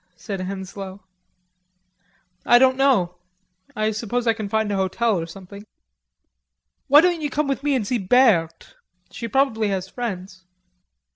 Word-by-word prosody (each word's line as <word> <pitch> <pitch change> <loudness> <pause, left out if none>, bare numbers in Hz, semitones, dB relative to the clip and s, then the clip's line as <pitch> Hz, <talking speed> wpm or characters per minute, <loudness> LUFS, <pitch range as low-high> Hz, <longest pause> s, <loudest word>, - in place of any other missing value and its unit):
said 195 +2 -6
Henslowe. 190 +1 -7 1.4
"I 240 - +6
don't 260 +1 +4
know.... 240 -11 +2 0.6
I 215 0 0
suppose 230 +3 -3
I 230 - +3
can 215 -3 -6
find 220 0 0
a - - 0
hotel 190 +2 0
or 165 - -5
something." 195 +3 -11 1.2
"Why 290 +2 +7
don't 350 -1 +1
you 295 - -2
come 295 +1 -1
with 275 -1 -2
me 290 -1 +1
and 235 -5 -1
see 240 +3 -1
Berthe; 190 -6 +2 0.4
she 235 -1 -6
probably 225 -3 +1
has 190 -2 -2
friends." 190 -5 -6
215 Hz, 145 wpm, -22 LUFS, 190-250 Hz, 1.4 s, Why